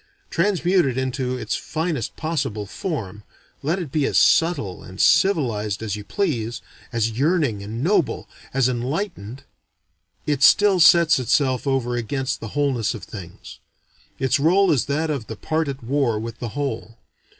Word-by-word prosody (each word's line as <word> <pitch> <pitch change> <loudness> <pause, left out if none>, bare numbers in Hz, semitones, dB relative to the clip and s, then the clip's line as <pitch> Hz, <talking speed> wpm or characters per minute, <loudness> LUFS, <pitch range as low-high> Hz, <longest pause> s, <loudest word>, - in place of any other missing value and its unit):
Transmute 180 0 +2
it 130 -2 -1
into 130 -1 -2
its - - -3
finest 160 -7 -3
possible 140 -10 -2
form, 105 - -5 0.4
let 155 +6 0
it 170 -8 -5
be 150 -2 +1
as - - 0
subtle 150 - +2
and 95 +2 -12
civilized 110 - +2
as 105 -2 -2
you 105 - -7
please, 120 - -2 0.3
as 115 -1 0
yearning 140 - +1
and 110 +5 -5
noble, 180 -3 +1 0.2
as 135 -2 +2
enlightened, 130 - -4 0.8
it 145 -2 -1
still 205 +3 +5
sets 170 -3 +6
itself 130 +2 +1
over 130 -3 0
against 135 +3 -2
the 115 - -6
wholeness 130 -6 0
of 105 - -9
things; 90 -3 -10 0.6
its 130 +1 +1
role 185 +7 +4
is 135 - +2
that 155 +3 -1
of 135 -7 -4
the 110 - -6
part 160 +7 -1
at 135 -2 -5
war 130 -2 0
with 115 +1 -7
the 120 - -4
whole. 115 -3 -4
135 Hz, 155 wpm, -22 LUFS, 115-160 Hz, 0.8 s, sets